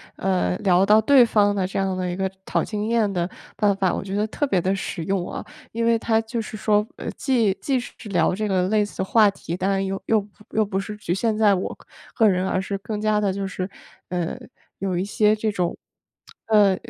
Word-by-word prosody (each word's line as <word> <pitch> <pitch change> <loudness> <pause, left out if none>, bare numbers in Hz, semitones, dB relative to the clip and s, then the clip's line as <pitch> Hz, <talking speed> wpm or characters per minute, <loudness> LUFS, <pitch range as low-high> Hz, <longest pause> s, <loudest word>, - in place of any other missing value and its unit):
呃， 185 -1 0
聊 190 -2 +4
到 210 +2 +6
对 255 +2 +6
方 205 -3 +3
的 190 -2 0
这 190 - -5
样 190 -1 0
的 180 -1 -2
一 175 - -3
个 190 0 -2
讨 - - 0
经 210 -1 -3
验 225 -3 +2
的 175 -2 -1 0.3
办 205 -1 +3
法。 190 -2 +1
我 - - -2
觉 195 0 -5
得 210 +1 +1
特 290 +6 -1
别 190 -9 +1
的 190 +3 +1
实 185 -3 -4
用 185 +1 -1
啊， - - -5 0.3
因 230 +1 -1
为 230 -1 +3
他 225 0 +2
就 225 +1 -4
是 220 - -7
说， 210 -1 +2
呃， - - -5
既 235 -7 +1
既 270 +4 -1
是 245 - -5
是 225 - -10
聊 185 -2 +2
这 215 +3 -2
个 185 -2 +1
类 210 0 +3
似 205 - -4
话 210 +2 +5
题， 175 -3 -6
当 190 +1 0
然 195 0 +1
又 195 0 -3
又 215 -2 +2 0.3
又 220 0 +2
不 195 -1 -2
是 205 +2 -5
局 210 -4 -3
限 215 +3 0
在 210 -2 +5
我 185 - -4 0.4
个 220 -3 +5
人， 185 0 +1
而 185 - 0
是 195 +1 -3
更 205 +1 -5
加 215 -1 +2
的 200 -2 0
就 195 0 -3
是， 190 0 -4 0.4
呃， 175 +3 -3 0.4
有 190 -2 -2
一 180 - 0
些 210 +1 +2
这 215 0 -1
种 180 -4 -2 0.7
呃， 205 -3 +5
200 Hz, 250 characters per minute, -23 LUFS, 190-215 Hz, 0.7 s, 到